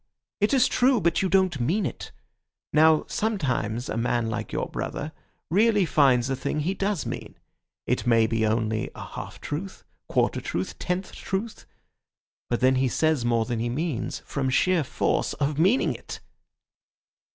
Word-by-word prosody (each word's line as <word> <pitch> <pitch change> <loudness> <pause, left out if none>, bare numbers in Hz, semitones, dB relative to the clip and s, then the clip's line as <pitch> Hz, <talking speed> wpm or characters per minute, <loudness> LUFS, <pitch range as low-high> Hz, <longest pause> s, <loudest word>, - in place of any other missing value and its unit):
It 205 +1 +2
is 260 -2 +4
true, 255 -1 +3
but 170 -3 +1
you 190 - +1
don't 185 -5 +2
mean 170 - +1
it. 130 - -5 0.6
Now, 155 +1 +5
sometimes 130 - -1
a 105 - -3
man 115 -1 0
like 110 - -4
your - - -2
brother 150 +2 -4 0.4
really 210 +1 +4
finds 130 -6 +3
a 135 - 0
thing 150 +3 -2
he 175 +6 0
does 195 -3 -1
mean. - - -6 0.5
It - - -1
may 115 -2 +5
be 110 0 0
only 110 0 0
a - - -7
half - - -8
truth, 180 +7 -5 0.3
quarter - - +1
truth, - - -4
tenth 180 +1 -2
truth; 210 +4 -5 0.8
but 120 - 0
then 130 0 +4
he 130 0 +2
says 155 +1 +1
more 115 -1 +2
than 120 -1 -2
he 120 +1 -1
means—from 140 -1 -2
sheer 175 +5 +3
force 140 - 0
of 145 +1 -1
meaning 195 +10 +3
it." - - -8
150 Hz, 160 wpm, -26 LUFS, 120-190 Hz, 0.8 s, Now